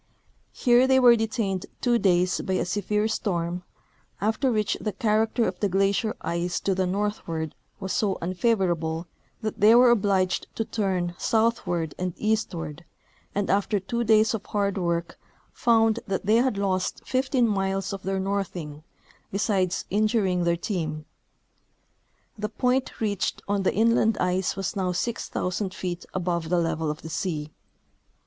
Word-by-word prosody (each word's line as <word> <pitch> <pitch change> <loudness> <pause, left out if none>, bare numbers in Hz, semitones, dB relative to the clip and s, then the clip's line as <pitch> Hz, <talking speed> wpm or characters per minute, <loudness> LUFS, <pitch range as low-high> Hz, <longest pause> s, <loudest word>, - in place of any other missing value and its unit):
Here 245 0 +4
they 265 0 +5
w^ere 245 -2 +7
detained 220 -4 -2
two 240 -2 +2
days 180 -2 +2
by 190 - -2
a 185 - +1
severe 210 +3 0
storm, 180 -5 -2 0.6
after 220 +6 +1
which 215 -2 +1
the 215 - -2
character 220 +3 +1
of - - -4
the 205 - +1
glacier 195 +3 +1
ice 170 +1 -1
to 195 - +1
the 185 0 0
northward 180 -5 -2 0.3
was 190 -1 -3
so 200 -3 +1
unfavorable 175 -4 0 0.4
that 215 - -3
they 215 +3 +7
were 245 0 +7
obliged 195 -5 +1
to 225 - -1
turn 185 -6 -1
southward 185 -8 0
and 180 -2 -2
eastward, 175 -8 -2 0.5
and 205 -1 0
after 200 +1 +1
tAvo 235 +5 -2
days 220 +1 +4
of 215 -3 -3
hard 200 -1 0
Avork 170 -2 -1 0.4
found 225 -1 +3
that 195 -1 -2
they 215 +2 +4
had 245 -3 +2
lost 190 -2 -1
15 255 -1 +1
miles 195 -1 -1
of 195 - -5
their 190 0 -2
northing, 185 -6 -3 0.5
besides 195 -3 0
injuring 205 -4 +2
their 170 0 +2
team. 160 -5 -3 1.3
The 210 0 -2
point 250 +4 0
reached 205 -4 -1
on 200 0 +1
the 190 - +1
inland 225 0 +3
ice 180 +1 0
Avas 195 -2 -3
noAV 185 -2 -1
6,000 190 -2 -2
feet 180 -1 -4
above 170 -3 -2
the 180 - +2
level 165 -2 0
of 150 +1 -5
the 160 - -7
sea. 155 -2 -3
195 Hz, 150 wpm, -26 LUFS, 180-220 Hz, 1.3 s, w^ere